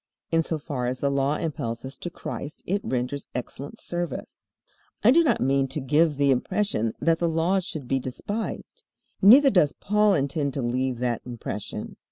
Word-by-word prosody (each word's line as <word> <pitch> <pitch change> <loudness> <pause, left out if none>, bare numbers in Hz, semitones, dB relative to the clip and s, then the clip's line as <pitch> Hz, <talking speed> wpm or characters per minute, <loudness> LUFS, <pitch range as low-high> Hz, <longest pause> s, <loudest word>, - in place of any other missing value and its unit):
In 165 0 +4
so 160 0 -2
far 140 -5 -3
as 125 +1 -2
the 140 - +1
Law 140 +1 +1
impels 125 -8 -3
us 135 - -6
to 175 - -5
Christ 155 -2 -7
it 200 +3 0
renders 130 +3 -2
excellent 140 - -6
service. 175 -5 -5 0.5
I 230 - +7
do 335 +5 +6
not 310 - +2
mean 135 +1 +2
to 150 - -4
give 150 +2 +2
the 140 -1 +3
impression 125 - 0
that 165 -1 +2
the 170 - +1
Law 165 +4 +2
should 155 -7 -6
be 135 +1 +1
despised. 205 - -5 0.4
Neither 265 +8 +8
does 165 - +4
Paul 210 0 +2
intend 140 0 -1
to 135 - -2
leave 125 +1 -1
that 120 -1 -1
impression. 120 -4 -6
145 Hz, 180 wpm, -25 LUFS, 130-175 Hz, 0.5 s, Neither